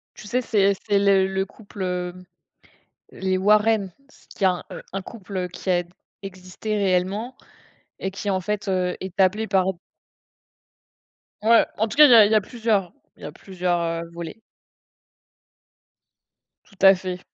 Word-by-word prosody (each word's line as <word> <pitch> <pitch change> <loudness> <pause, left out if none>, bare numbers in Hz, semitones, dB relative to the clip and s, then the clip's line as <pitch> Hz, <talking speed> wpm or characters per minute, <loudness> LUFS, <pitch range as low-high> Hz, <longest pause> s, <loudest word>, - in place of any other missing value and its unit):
Tu 215 - -12
sais, 250 +4 0
c'est 200 -4 +2
c'est 205 -1 +3
le 195 -1 +3
le 190 0 -2
couple, 200 0 -10
hem, 180 0 -4 0.9
les 190 0 -2
Warren, 210 0 +2 0.2
parce - - -23
qu'il - - -12
y - - +4
a 180 -1 0 0.3
un 195 0 -4
couple, 200 -1 -10
heu, 180 -1 -2
qui 185 +1 -5
a 175 -1 +2
d 175 - -21 0.3
existé 190 +2 -6
réellement 200 +5 -1 0.6
et 190 - -3
qui 195 +1 -5
en 190 -1 +1
fait, 210 +3 -4
heu, 180 -1 0
est 190 0 -8
appelé 200 +4 +2
par 190 -2 +2 1.8
Ouais, 230 +1 +5
en 220 - +1
tout 220 - -8
cas, 300 - +10
il 285 - +5
y - - +9
a 220 -2 +9
il 205 - 0
y - - +4
a 215 - +4
plusieurs 215 -4 -1 0.2
il - - -22
y - - -8
a - - -6
plusieurs, 180 +1 -2
heu, 165 0 -3
volets. 170 +5 -8 2.2
Tout 200 - -23
à 195 0 +8
fait. 185 -1 -5
195 Hz, 175 wpm, -23 LUFS, 185-210 Hz, 2.2 s, cas